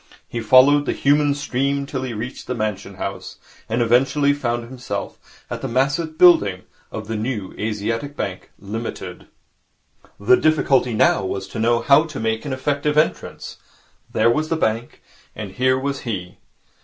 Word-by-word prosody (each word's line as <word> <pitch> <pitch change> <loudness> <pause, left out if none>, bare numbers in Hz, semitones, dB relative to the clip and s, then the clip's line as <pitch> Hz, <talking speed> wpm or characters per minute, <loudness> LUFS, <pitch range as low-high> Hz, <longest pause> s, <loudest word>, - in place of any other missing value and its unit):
He 120 - -4
followed 130 +6 +5
the - - +1
human 145 0 +2
stream 140 0 -1
till 135 -2 -4
he 130 -1 -4
reached 115 +3 -6
the 125 - -2
Mansion 105 -3 -3
House, - - -6 0.3
and 120 +2 +1
eventually 135 +5 +3
found 120 -4 -2
himself 125 +1 -7
at - - -6
the - - -3
massive 145 +6 0
building 100 - +5 0.3
of 110 -1 -6
the 115 - -3
New 110 -3 -3
Asiatic 115 +6 -3
Bank, 95 -2 -4
Limited. 110 +4 -6 0.9
The 120 +5 +5
difficulty 135 -6 +2
now 105 -1 +3
was 95 0 -4
to 110 - -6
know 115 +1 +2
how 145 +3 +5
to 150 -4 -7
make 110 +3 -1
an 145 - -4
effective 145 +3 -1
entrance. 155 - -1 0.5
There 115 +2 +3
was 155 +5 -1
the 165 - +1
bank, 115 -4 -2 0.3
and 105 -3 -6
here 130 +4 +2
was 140 +1 -2
he. 90 -7 -5
125 Hz, 160 wpm, -21 LUFS, 110-140 Hz, 0.9 s, followed